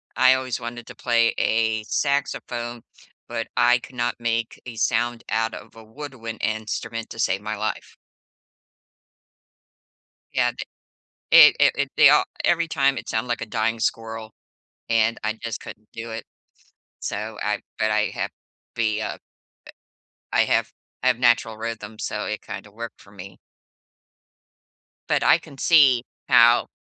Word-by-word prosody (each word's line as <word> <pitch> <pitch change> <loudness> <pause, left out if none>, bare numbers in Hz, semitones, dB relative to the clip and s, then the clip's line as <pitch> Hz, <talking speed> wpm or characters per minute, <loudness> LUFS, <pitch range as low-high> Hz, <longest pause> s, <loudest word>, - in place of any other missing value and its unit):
I 130 0 +6
always 130 -2 -3
wanted 120 0 -7
to - - -10
play 115 -1 +2
a 110 -1 +1
saxophone, 120 -4 -2 0.4
but 115 - -4
I 120 0 +5
could 125 - -13
not 120 0 -1
make 115 -1 -2
a 120 -2 -8
sound 120 +1 0
out 115 0 0
of - - -10
a 110 - -12
woodwind 115 -2 -8
instrument 110 +1 -3
to 115 - -9
save 100 -2 +1
my 110 0 -4
life. 110 +1 -4 2.4
Yea, - - +2
they - - -5 0.9
It - - -14
it - - +6
it - - 0
they - - +8
all - - +5 0.2
every 170 -1 +2
time 140 -3 +2
it - - -9
sound 110 +1 -1
like 120 - -1
a 115 - -4
dying 115 +1 -1
squirrel, 110 -1 -3 0.6
and 115 0 +2
I 110 0 0
just 115 0 -6
couldn't 105 0 -11
do 115 0 -7
it, 110 - -6 0.8
so 105 +1 -4
I 105 0 0 0.2
but 110 0 +2
I 105 0 +2
have - - -3 0.4
be, 110 -1 0
uh - - -4 1.1
I - - +4
have - - +1 0.3
I 130 - +2
have 125 -2 +3
natural 120 -3 +3
rhythm, 110 -1 -6
so 105 0 -3
it 105 - -4
kinda 100 +2 -8
worked 115 +2 -8
for 100 - -18
me. 100 -1 -11 1.7
But - - +2
I - - +6
can 155 -5 -14
see 135 -8 +5 0.3
how 120 +1 +6
115 Hz, 150 wpm, -23 LUFS, 110-120 Hz, 2.4 s, they